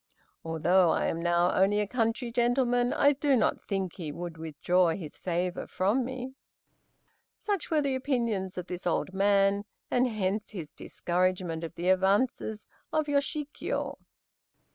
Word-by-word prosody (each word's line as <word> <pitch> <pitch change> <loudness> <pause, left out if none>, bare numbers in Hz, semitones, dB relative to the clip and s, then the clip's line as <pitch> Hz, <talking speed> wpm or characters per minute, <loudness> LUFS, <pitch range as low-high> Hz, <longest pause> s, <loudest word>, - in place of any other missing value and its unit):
Although 165 +3 +3
I - - +1
am 165 - -1
now 175 +1 +3
only 200 +2 +3
a 210 - +1
country 230 +2 -1
gentleman, 245 0 +2
I 285 +1 +4
do 285 0 +2
not 240 - +1
think 195 -4 -2
he 160 -5 -5
would 170 +2 -6
withdraw 165 +3 +1
his 160 -6 -8
favor 180 0 -2
from 205 +8 +1
me." 260 +1 -5 1.0
Such 400 -7 -2
were 310 -2 +2
the 275 -1 0
opinions 235 -8 -1
of 180 - -3
this 180 0 -5
old 180 +2 0
man, 200 0 +3 0.3
and 250 +1 +3
hence 210 -2 -2
his 170 -8 -7
discouragement 180 -2 -1
of 165 0 -6
the 175 +2 -1
advances 205 +3 +1 0.3
of 310 -1 +1
Yoshikiyo. 290 0 -2
195 Hz, 145 wpm, -29 LUFS, 180-250 Hz, 1.0 s, I